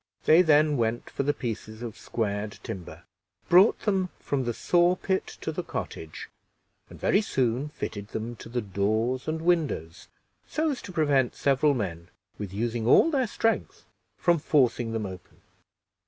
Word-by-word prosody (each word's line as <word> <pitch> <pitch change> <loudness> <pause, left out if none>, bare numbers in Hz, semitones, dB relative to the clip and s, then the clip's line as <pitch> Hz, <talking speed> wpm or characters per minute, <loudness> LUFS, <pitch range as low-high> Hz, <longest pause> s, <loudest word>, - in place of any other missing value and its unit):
They 160 +3 +7
then 150 -3 +4
went 115 0 -1
for - - -2
the 140 +1 +2
pieces 110 -3 -5
of 115 -3 -6
squared 105 -2 -3
timber, 90 -3 -7 0.5
brought 185 +5 +6
them 190 -3 0
from 135 -3 -2
the 120 - 0
saw 175 +1 +3
pit 190 +1 -1
to - - -2
the 165 - -3
cottage, 100 - -6 0.6
and - - -12
very 200 - +3
soon 130 - 0
fitted 100 -8 -6
them 110 +2 -5
to - - -10
the 120 0 -2
doors 110 +6 -1
and 160 +1 -2
windows, 155 - 0 0.4
so 310 0 0
as 265 - -5
to - - -9
prevent 145 -7 +2
several 140 +1 +2
men, 85 -7 -4 0.3
with 100 -3 -5
using 115 +2 -2
all 330 - +6
their 265 -5 +1
strength, 225 +1 -1 0.3
from 170 -2 +3
forcing 125 -6 +2
them 110 -2 -2
open. 95 -2 -10
130 Hz, 160 wpm, -27 LUFS, 110-165 Hz, 0.6 s, They